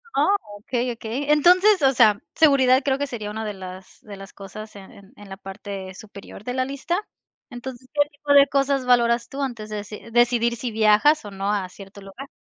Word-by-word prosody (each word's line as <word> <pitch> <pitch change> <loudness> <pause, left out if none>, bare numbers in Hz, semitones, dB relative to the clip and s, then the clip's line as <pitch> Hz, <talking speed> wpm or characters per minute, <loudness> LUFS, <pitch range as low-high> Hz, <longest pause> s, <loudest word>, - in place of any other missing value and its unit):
Oh, 300 +9 +3 0.2
okey, 245 +3 -2
okey. 240 +5 -3
Entonces, 365 +6 +5
o 270 -1 +4
sea, 215 -5 +4
seguridad 270 -4 +4
creo 270 -1 +1
que 285 +1 -2
sería 215 -5 -6
una 220 +1 -5
de 210 - -4
las 185 -1 -11
de 205 -2 -11
las 195 +1 -12
cosas 215 +2 -10
en 195 -1 -12
en 200 0 -17
en 205 -1 -14
la 195 - -8
parte 195 -1 -8
superior 200 0 -12
de 245 - -4
la 255 0 0
lista. 280 +7 -3 0.5
Entonces, 250 0 -9
¿qué 290 -1 +2
tipo 290 -1 -1
de 280 0 +7
cosas 275 -1 0
valoras 235 -1 +2
tú 275 - -6
antes 235 -6 -4
de 215 - -4
deci 210 +2 -9
decidir 240 0 +2
si 240 +1 -4
viajas 220 +8 +4
o 205 - -8
no 195 +1 -2
a 200 -3 -1
cierto 195 +2 -13
lugar? 195 +8 -10
235 Hz, 210 wpm, -23 LUFS, 205-275 Hz, 0.5 s, de